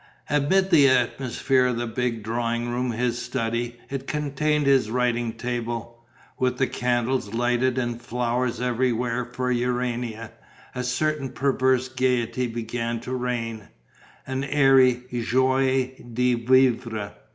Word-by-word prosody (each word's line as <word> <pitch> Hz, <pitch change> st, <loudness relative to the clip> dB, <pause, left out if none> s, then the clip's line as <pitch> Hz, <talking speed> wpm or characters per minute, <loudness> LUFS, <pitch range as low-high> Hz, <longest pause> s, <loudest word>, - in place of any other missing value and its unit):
Amid 190 Hz, +7 st, +2 dB
the 145 Hz, -5 st, +7 dB
atmosphere 130 Hz, 0 st, +1 dB
of 125 Hz, -2 st, -1 dB
that 120 Hz, -1 st, -4 dB
big 120 Hz, -3 st, -1 dB
drawing 120 Hz, +1 st, -1 dB
room, 125 Hz, +1 st, -1 dB
his 120 Hz, +1 st, -1 dB
study 120 Hz, -1 st, -3 dB
it 135 Hz, -1 st, -5 dB
contained 150 Hz, 0 st, 0 dB
his 135 Hz, -5 st, +3 dB
writing 120 Hz, -1 st, 0 dB
table 120 Hz, -1 st, -4 dB, 0.4 s
with 125 Hz, -1 st, +1 dB
the 130 Hz, -, +2 dB
candles 120 Hz, -3 st, -1 dB
lighted 120 Hz, +1 st, +1 dB
and 120 Hz, -2 st, -2 dB
flowers 120 Hz, +1 st, -1 dB
everywhere 125 Hz, 0 st, 0 dB
for 125 Hz, +1 st, -3 dB
Urania, 120 Hz, -2 st, -2 dB, 0.4 s
a 125 Hz, -, -3 dB
certain 140 Hz, +2 st, -1 dB
perverse 130 Hz, -1 st, +1 dB
gaiety 125 Hz, -1 st, 0 dB
began 115 Hz, 0 st, -3 dB
to 125 Hz, +2 st, -5 dB
reign, 115 Hz, -4 st, -3 dB, 0.6 s
an 130 Hz, +1 st, -3 dB
airy 135 Hz, -3 st, +4 dB, 0.2 s
joie 130 Hz, +1 st, +2 dB, 0.2 s
de 125 Hz, +2 st, +2 dB
vivre. 120 Hz, -3 st, +2 dB
125 Hz, 125 wpm, -24 LUFS, 120-130 Hz, 0.6 s, the